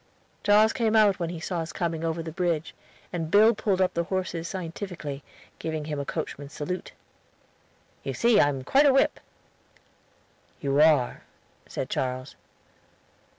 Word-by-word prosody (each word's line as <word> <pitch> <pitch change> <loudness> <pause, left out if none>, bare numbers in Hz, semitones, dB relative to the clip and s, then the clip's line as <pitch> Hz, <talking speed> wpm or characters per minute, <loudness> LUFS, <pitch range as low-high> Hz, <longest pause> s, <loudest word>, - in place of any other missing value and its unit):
Charles 210 +2 +5
came 225 -2 +1
out 210 -3 +5
when 170 -2 -2
he 170 -1 -5
saw 175 +2 -3
us 160 -1 -4
coming 165 -1 -2
over 165 0 -2
the 160 - -6
bridge, 170 -2 -1 0.4
and 165 -3 -2
Bill 215 +5 +6
pulled 205 -3 0
up 185 -1 +2
the 170 0 -1
horses 180 -3 -3
scientifically, 170 -5 -5 0.4
giving 160 -2 -3
him 150 -2 -3
a 140 - -3
coachman's 140 +1 -5
salute. 180 +5 -4 1.1
"You - - -4
see 235 -3 +4
I 145 - +5
am 135 -2 -4
quite 275 - +4
a 275 - +5
whip." 270 - +3 1.4
"You 140 +1 +2
are," 150 -6 +4 0.5
said - - -4
Charles. 130 0 -3
170 Hz, 150 wpm, -26 LUFS, 150-195 Hz, 1.4 s, Bill